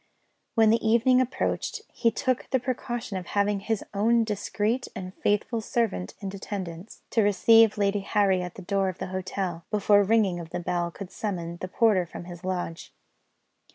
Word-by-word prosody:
When 220 -2 +5
the 230 - +2
evening 235 +3 +4
approached, 430 - -2
he 230 - +2
took 255 +2 -1
the 260 - +2
precaution 240 -4 -3
of 180 -2 -6
having 205 0 +1
his 220 +1 -2
own 230 +3 +3
discreet 215 +3 -1
and 185 0 -6
faithful 210 +4 0
servant 215 - -1
in 195 - -4
attendance, 190 -1 -7
to 225 - +3
receive 220 +2 +5
Lady 200 0 +1
Harry 195 -2 +2
at 180 -1 -6
the 195 - -9
door 195 +1 +1
of 185 - -6
the - - -5
hotel, 185 -2 -3
before 205 -1 +4
the 200 - +3
ringing 205 -6 +3
of 165 -1 -8
the 175 - -4
bell 175 0 -1
could 185 +2 -9
summon 170 -5 -4
the 185 - -5
porter 195 -3 +2
from 170 - -8
his 175 -1 -10
lodge. 180 -3 -4
200 Hz, 180 wpm, -27 LUFS, 185-225 Hz, -, When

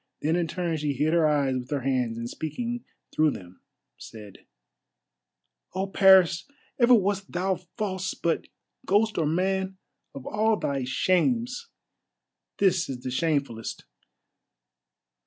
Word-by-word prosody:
Then 160 +3 +2
in 175 -1 0
turn 170 -1 -2
she 150 -1 -1
hid 150 +4 0
her 165 -2 +4
eyes 140 -3 +1
with 125 - -9
her 145 -2 -1
hands, 125 -3 0
and 115 0 -4
speaking 235 - -4 0.3
through 155 0 +3
them 90 -8 -9 0.4
said: 105 -3 -12 1.3
"Oh, 190 +1 0
Paris! 190 -2 +5 0.3
ever 245 0 +7
wast 195 -2 0
thou 185 +1 0 0.2
false, 190 -4 -2
but, 170 - -1 0.4
ghost 210 +1 +2
or 155 - +1
man, 190 +3 0 0.4
of 135 - -8
all 215 +1 +1
thy 135 -6 -2
shames 235 - 0 0.9
this 185 -4 +2
is 125 -2 -5
the 130 - -3
shamefullest. 140 -6 -2
170 Hz, 130 wpm, -26 LUFS, 140-195 Hz, 1.3 s, ever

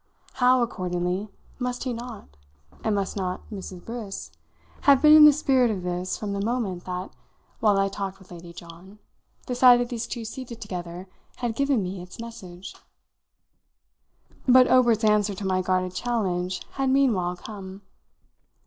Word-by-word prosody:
How, 250 -1 +4
accordingly, 180 -2 -2 0.3
must 250 -1 -3
he 255 -2 -2
not 230 - -9 0.5
and 215 -2 +1
must 200 -1 -2
not 185 -2 -4
Mrs. 190 -3 -8
Briss 215 - -6 0.6
have 275 -2 +7
been 300 +2 +7
in 305 -1 +10
the 300 - +10
spirit 270 -4 +2
of 195 -5 -3
this 180 +1 -3
from 205 -2 -4
the 200 0 -2
moment 210 -6 -2
that, 180 0 -5 0.5
while 210 -3 +3
I 195 0 +2
talked 195 -1 -5
with 190 -2 -19
Lady 170 0 -10
John, 170 +4 -13 0.5
the 250 - -3
sight 245 0 +7
of 245 0 -1
these 235 -2 -4
two 235 -2 -5
seated 235 0 -8
together 180 -3 -6 0.3
had 240 -3 -3
given 275 -4 +1
me 185 0 -5
its 180 +4 -12
message! 190 -6 -9 1.7
But 255 0 +7
Obert's 240 -3 +4
answer 210 -1 +3
to 195 - -6
my 185 -1 +1
guarded 185 0 0
challenge 185 -5 -2
had 270 -1 -1
meanwhile 225 -10 +2
come. 195 0 -9
205 Hz, 160 wpm, -25 LUFS, 185-245 Hz, 1.7 s, in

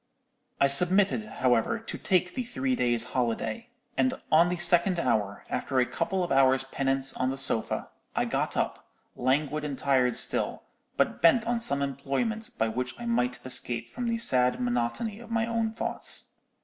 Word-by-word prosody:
"I - - +5
submitted, 190 +9 +3
however, 125 - +1
to 225 - -7
take 180 -2 +1
the 255 - -2
three 255 +2 -2
days' 120 - +2
holiday; 125 - -2 0.3
and 260 0 +1 0.2
on 165 +3 +5
the 180 - -2
second 175 +2 +3
day, 170 - -2
after 105 +5 -1
a 125 - +4
couple 180 +7 -2
of 175 - -4
hours' 135 -1 +4
penance 135 0 0
on 130 - -1
the 135 - -3
sofa, 125 -4 +1 0.3
I - - +1
got - - -2
up, - - -2 0.3
languid 145 +4 0
and 145 -3 -4
tired 130 -3 +2
still, - - 0 0.3
but - - 0
bent 195 +8 +5
on 235 0 0
some 140 -11 0
employment 140 - -2
by 110 - +1
which 125 +3 -4
I 240 - -6
might 125 - -1
escape 120 -2 +1
from 245 -1 -4
the 230 0 0
sad 125 - +3
monotony 125 - -2
of 235 -1 -12
my 230 -1 0
own 230 -1 -1
thoughts. 225 - -2
140 Hz, 175 wpm, -28 LUFS, -, 0.3 s, I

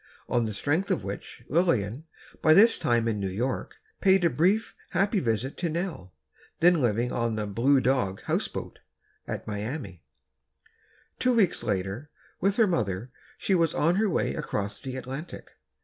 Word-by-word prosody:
On 120 -1 +1
the 110 - -3
strength 160 - 0
of - - 0
which, 100 +4 -7
Lillian, 145 - +1 0.4
by 155 -1 +6
this 225 +4 +6
time 120 -1 +2
in 110 -2 -1
New 100 -1 -2
York, 120 +8 -3 0.2
paid 190 -2 +4
a 170 - +3
brief, 195 +8 +1
happy 200 +2 +1
visit 120 - -1
to 175 - -1
Nell, 160 - -4 0.4
then 175 -2 +5
living 120 0 +1
on 115 -2 -1
the 105 -1 -2
"Blue 120 +7 +3
Dog 125 -7 0
Houseboat," - - -3 0.5
at - - -4
Miami. 105 - -5 1.2
Two 250 -1 +2
weeks 200 -7 +3
later, 95 +9 -2 0.3
with 195 +2 +2
her 225 - +5
mother, 115 - -1 0.3
she 195 - 0
was 165 -3 +2
on 170 +4 +2
her 215 0 +2
way - - 0
across 100 0 -3
the 130 -1 -5
Atlantic. 135 +6 -7
130 Hz, 160 wpm, -27 LUFS, 110-175 Hz, 1.2 s, by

